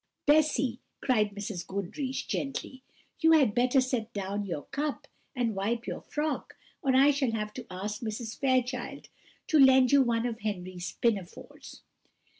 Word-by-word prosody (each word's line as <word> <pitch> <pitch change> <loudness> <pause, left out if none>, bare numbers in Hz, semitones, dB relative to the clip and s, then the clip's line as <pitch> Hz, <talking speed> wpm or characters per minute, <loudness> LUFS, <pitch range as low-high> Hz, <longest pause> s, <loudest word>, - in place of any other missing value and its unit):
"Bessy," 290 -5 +3 0.3
said 215 -5 +3
Mrs. 200 -3 -4
Goodriche 200 - -3
gently, 270 -1 -4 0.4
"you 325 0 +5
had 275 -10 +5
better 250 +3 +3
set 250 -3 -1
down 200 0 -3
your 165 -5 -4
cup 295 0 -3 0.3
and 240 -3 0
wipe 225 +5 -2
your - - -5
frock, 300 0 -3 0.2
or 265 -1 +2
I 275 +2 +6
shall 270 -5 0
have 210 -1 -3
to 250 -2 -8
ask 205 +5 -5
Mrs. 225 0 -5
Fairchild 255 0 -1 0.4
to 315 -4 +3
lend 265 -2 +7
you 280 -1 +6
one 235 -2 +1
of 230 -2 -3
Henry's 185 -3 -4
pinafores." 200 -7 -3
240 Hz, 150 wpm, -29 LUFS, 210-270 Hz, 0.4 s, lend